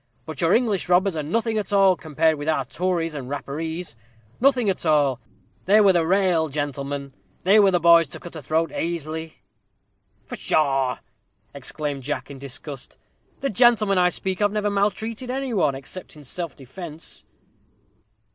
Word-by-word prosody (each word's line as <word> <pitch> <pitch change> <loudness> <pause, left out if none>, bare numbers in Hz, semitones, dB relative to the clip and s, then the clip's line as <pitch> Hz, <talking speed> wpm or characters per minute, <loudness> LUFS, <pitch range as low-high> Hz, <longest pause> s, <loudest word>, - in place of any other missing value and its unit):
"But - - -6
your - - +3
English 215 -7 +1
robbers 180 +1 +3
are 155 - -1
nothing 220 +8 0
at 205 - -4
all, 195 -2 +5
compared 160 0 +1
with 145 +2 -2
our 145 -4 +1
Tories 165 +4 -1
and 135 -4 -6
Rapparees 160 +3 -4 0.4
nothing 255 -3 +3
at 190 - 0
all. 145 -6 +2 0.5
They 205 +3 +5
were 200 -3 +6
the 165 -2 +2
raal 180 -4 +2
gentlemen 140 -1 -4 0.3
they 200 +4 +6
were 200 -2 +6
the 180 -2 +2
boys 170 -1 +6
to 135 - -9
cut 175 - -11
a 155 - -6
throat 160 +4 0
aisily." 160 -1 -4 0.8
"Pshaw!" 135 -4 +1 0.6
exclaimed 140 +1 -4
Jack, 145 +2 -4
in 135 - -9
disgust, 140 0 -8 0.4
"the 275 - -1
gentlemen 215 -3 +4
I 180 0 +4
speak 190 +2 -2
of 205 -1 +3
never 210 -1 0
maltreated 215 +4 -1
any 265 -1 -2
one, 150 -9 +2
except 140 +8 -8
in 150 - -13
self 170 +3 -4
defence." 155 +4 -9
165 Hz, 160 wpm, -23 LUFS, 145-195 Hz, 0.8 s, were